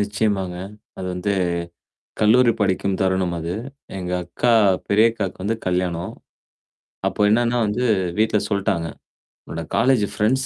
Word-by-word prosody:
நிச்சயமாங்க. 100 -3 -1 0.4
அது 95 - -4
வந்து 100 +3 -1 0.9
கல்லூரி 115 +3 +5
படிக்கும் 95 -1 +1
தருணம் 95 -2 +1
அது. 85 +2 -3 0.4
எங்க 90 -1 -4
அக்கா 105 +8 +1 0.4
பெரியக்காவுக்கு 105 -3 +2
வந்து 110 +4 0
கல்யாணம். 90 -2 -1 0.9
அப்போ - - -2
என்னன்னா 120 +2 +2
வந்து 110 +5 -1 0.3
வீட்ல 110 -1 +3
சொல்ட்டாங்க. 100 -4 0 0.6
உன்னோட 85 - -5
காலேஜ் 125 -1 +3
ஃப்ரெண்ட்ஸ் 120 +6 +1
100 Hz, 115 wpm, -22 LUFS, 90-110 Hz, 0.9 s, கல்லூரி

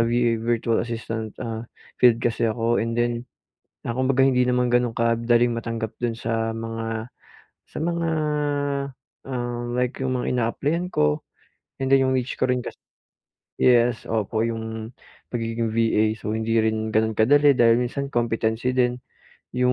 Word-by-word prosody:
VA, 115 0 +2
virtual 115 0 +1
assistant, 115 -2 -4
ah, 115 0 -4 0.4
field 120 -2 +7
kasi 115 -1 +1
ako 115 +1 +1
and 115 +1 -2
then, 120 0 0 0.7
ah, - - 0
kumbaga 130 0 +2
hindi 130 -2 +4
naman 125 0 +2
gano'n 120 -1 +2
kadaling 115 +1 +2
matanggap 115 -1 -4
do'n 120 -1 0
sa 115 -1 -1
mga 115 0 -4 0.6
sa - - -10
mga, 170 0 0 1.2
ah, 120 -2 -3 0.2
like 125 0 -1
'yong 130 -1 0
mga 125 - -3
ina-applyan 140 +8 0
ko 75 - +1 0.6
and 135 - 0
then 135 0 +5
'yong 130 - +1
niche 130 0 -1
ko - - +2
rin 125 0 +1
kasi - - -8 0.8
yes, 120 -2 +3
opo 110 0 -1
'yong 110 0 -5 0.4
pagiging 115 0 -1
VA. 110 -1 +2
So 105 - -5
hindi 110 +1 -1
rin 110 0 0
gano'n 110 +1 +2
kadali 145 +6 +6
dahil 115 -1 +6
minsan 135 +3 -2
competency 115 -1 0
din 125 -1 +2 0.6
'yong 125 0 +3
115 Hz, 150 wpm, -24 LUFS, 115-125 Hz, 1.2 s, field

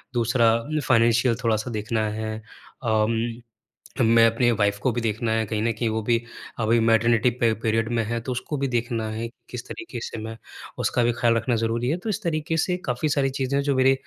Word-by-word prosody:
दूसरा 115 0 +3
अ, 145 +7 -1
फ़ाइनेंशियल 115 0 +4
थोड़ा-सा 115 +1 0
देखना 110 0 -1
है। 110 0 -3 0.5
अम, 110 -1 +2 0.8
मैं 115 0 +6
अपनी 115 +2 +2
वाइफ़ 100 -2 +1
को 130 - +3
भी 120 +1 -2
देखना 110 0 -1
है 110 0 +1
कहीं 105 +1 -2
न 115 - +2
कहीं 115 +1 -1
वो 110 0 -1
भी 115 +2 +2 0.4
अभी 115 +1 +3
मैटरनिटी 115 +1 +3
पे 115 -2 +4
पीरियड 115 0 +1
में 115 -1 +1
है 115 +2 -2
तो 130 - -5
उसको 125 +4 -3
भी 140 0 0
देखना 120 -2 -1
है 110 +2 -3 0.2
किस 125 -1 -6
तरीके 135 -8 -7
से - - -6
मैं 115 0 -6 0.4
उसका 120 - +1
भी 120 - +3
ख़्याल 115 -1 +3
रखना 120 +2 0
ज़रूरी 115 +2 0
है। 160 - 0
तो - - -1
इस 210 0 -2
तरीके 160 -1 -1
से 180 -1 -1
काफ़ी 125 +5 0
सारी 140 -2 +1
चीज़ें 140 +2 +1
जो 140 -1 0
मेरे 130 +1 +5
115 Hz, 210 wpm, -24 LUFS, 110-125 Hz, 0.8 s, मैं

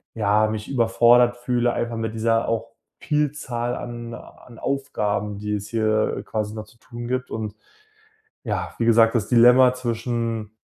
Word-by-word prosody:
ja, 105 0 +2
mich 110 0 -4
überfordert 120 -1 +4
fühle 120 0 0
einfach 120 0 -3
mit 110 -1 -3
dieser 115 +1 +1
auch 115 0 -2 0.3
Vielzahl 135 -5 -2
an 120 -1 -7
a 120 - -10 0.2
an 120 - -14
Aufgaben, 105 -7 -2
die 105 0 -4
es 105 0 -3
hier, 110 -1 +1
äh, - - -5
quasi 105 -1 -3
noch 110 - -6
zu 110 +2 -22
tun 120 -1 -8
gibt 125 +1 -2
und 110 -2 -4 0.9
ja, - - -3
wie 115 - +1
gesagt, 115 0 +5
das 105 -3 0
Dilemma 125 +1 +6
zwischen: 115 -3 -3
115 Hz, 165 wpm, -23 LUFS, 110-120 Hz, 0.9 s, Dilemma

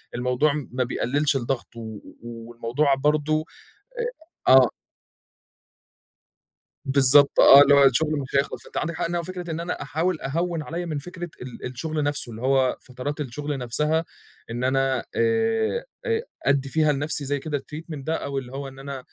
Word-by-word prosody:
الموضوع 125 +4 +1 0.2
ما 125 0 0
بيقلّلش 140 +4 0
الضغط 125 -1 -3
و 110 -3 -7 0.2
والموضوع 120 +4 -1
برضه 150 +2 +1 1.0
أ - - +7
آه. 130 -2 +7 2.2
بالضبط 140 +1 +5
آه، 140 +1 +10
اللي 145 0 +5
هو 140 - +6
الشغل 140 +4 +3
مش 135 0 -4
هيخلَص 140 - -1
أنتِ - - -13
عَندِك 170 - -1
حق - - -2
إنها 170 0 -1
فكرة 180 0 -6
إن 160 +1 -3
أنا 175 +1 -4
أحاول 165 +2 -1
أهوّن 165 +3 -2
عليَّ 170 +4 -5
من 155 -3 -3
فكرة 175 +3 -7
ال 125 -1 -9
الشغل 150 +5 -3
نفْسه، 145 -4 -1
اللي 115 +1 -9
هو 130 -1 +2
فترات 135 +3 -6
الشغل 145 +1 -4
نفْسها 150 +7 0 0.5
إن 120 +2 -3
أنا 135 0 +1 0.2
آآ 225 - +1 0.2
آآ 455 -1 +1 0.2
أدّي 140 -1 +2
فيها 155 +1 +2
لنفْسي 145 +1 0
زي 145 +1 -1
كده 145 +1 -3
الtreatment 150 +4 -9 0.2
ده 160 - -1
أو 140 -3 -3
اللي 125 -1 -7
هو 140 0 -5
إن 135 0 -13
أنا 135 0 -6
140 Hz, 165 wpm, -24 LUFS, 130-160 Hz, 2.2 s, آه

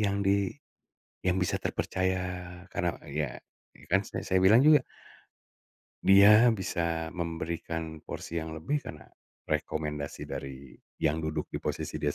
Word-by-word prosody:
yang 100 -1 +1
di 100 -1 +3 0.7
yang 90 0 +1
bisa 90 -1 0
terpercaya. 95 0 -1 0.5
Karena 85 -1 -1
ya, 75 -3 -3 0.6
kan 100 - +6
sa 100 - -6
saya 95 0 +2
bilang 110 +8 +6
juga 150 -3 +7 1.2
dia 105 +4 +8
bisa 85 -4 -2
memberikan 80 -1 -4
porsi 85 - -5
yang 80 0 -5
lebih, 85 - -1
karena - - -8 0.5
rekomendasi 75 -2 -3
dari 70 -1 -7 0.2
yang 75 +2 +2
duduk 80 -1 -3
di - - -3
posisi - - -3
dia 75 0 -1
85 Hz, 130 wpm, -29 LUFS, 80-100 Hz, 1.2 s, dia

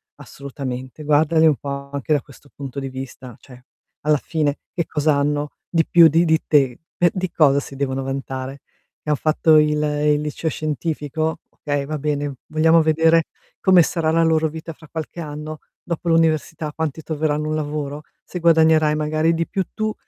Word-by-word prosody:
assolutamente. 135 0 -7
Guardali 155 +2 +3
un 155 -2 +5
po' 140 0 -6
anche 140 +2 -1
da 145 - +2
questo 140 0 -18
punto 140 -1 -6
di 135 - -4
vista, 130 -2 -8
cioè 125 -2 -15 0.4
alla 150 -1 +4
fine 150 -1 -1
che 170 -3 -1
cos'hanno 150 -1 0 0.2
di 165 -2 +2
più 170 -1 +7
di 165 +2 +3
di 160 -1 +2
te? 135 -5 +3 0.3
Eh, 175 - +6
di 185 -1 -2
cosa 140 -3 +4
si 140 - -9
devono 135 -1 -2
vantare? 135 0 -5 0.4
Che - - -7
han 150 - +3
fatto 155 0 +3
il 150 0 +3
il 150 0 +1
liceo 150 +2 -3
scientifico? 155 +1 -3
Okay, 145 -2 -3
va 155 +1 -3
bene, 145 -1 -2
vogliamo 160 +1 +4
vedere 160 +1 +3 0.3
come 185 -2 +6
sarà 160 -1 0
la 165 +1 +3
loro 160 -1 +2
vita 160 +1 -8
fra 160 +1 -17
qualche 160 +1 -6
anno, 150 0 -7 0.2
dopo 170 0 -4
l'università, 160 -1 +1
quanti 160 -1 -3
troveranno 150 -1 -1
un 155 - -1
lavoro? 150 -1 -4 0.2
Se 180 - -6
guadagnerai 160 -2 +4
magari 155 +2 +1
di 165 0 -1
più 195 -2 -1
tu, 215 0 -2
150 Hz, 175 wpm, -21 LUFS, 145-160 Hz, 0.4 s, più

